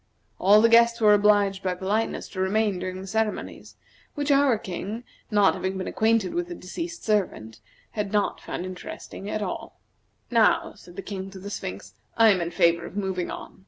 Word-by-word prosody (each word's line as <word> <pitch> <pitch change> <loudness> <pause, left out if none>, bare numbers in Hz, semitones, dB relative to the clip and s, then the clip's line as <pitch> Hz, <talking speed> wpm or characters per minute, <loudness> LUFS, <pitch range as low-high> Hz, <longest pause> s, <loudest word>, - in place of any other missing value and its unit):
All 205 +3 +6
the - - +7
guests 235 +1 +5
were 210 -2 +6
obliged 205 -2 +3
by 185 -1 -1
politeness 205 +5 -1
to 185 - -8
remain 200 0 +1
during 185 0 -5
the - - -8
ceremonies, 220 +2 -3 0.4
which 290 0 -1
our 275 -4 +4
King, 205 +4 -6 0.3
not 205 -2 +4
having 190 0 -3
been 185 - -3
acquainted 220 -3 +1
with 350 +1 -1
the 350 - -6
deceased 335 - -6
servant, 145 - -1 0.3
had 205 -2 -3
not 205 -1 0
found - - -5
at - - -4
all - - -5
interesting. 195 +2 -8 1.0
"Now," 230 -2 +3
said 175 - -15
the 195 - -6
King 195 -1 -6
to 195 - -11
the 200 +2 -8
Sphinx, 95 - -6 0.2
"I 225 -1 +7
am 190 -4 +3
in 170 - -2
favor 170 0 +2
of 195 - -10
moving 190 -3 -2
on. - - -8
200 Hz, 190 wpm, -25 LUFS, 185-220 Hz, 1.0 s, the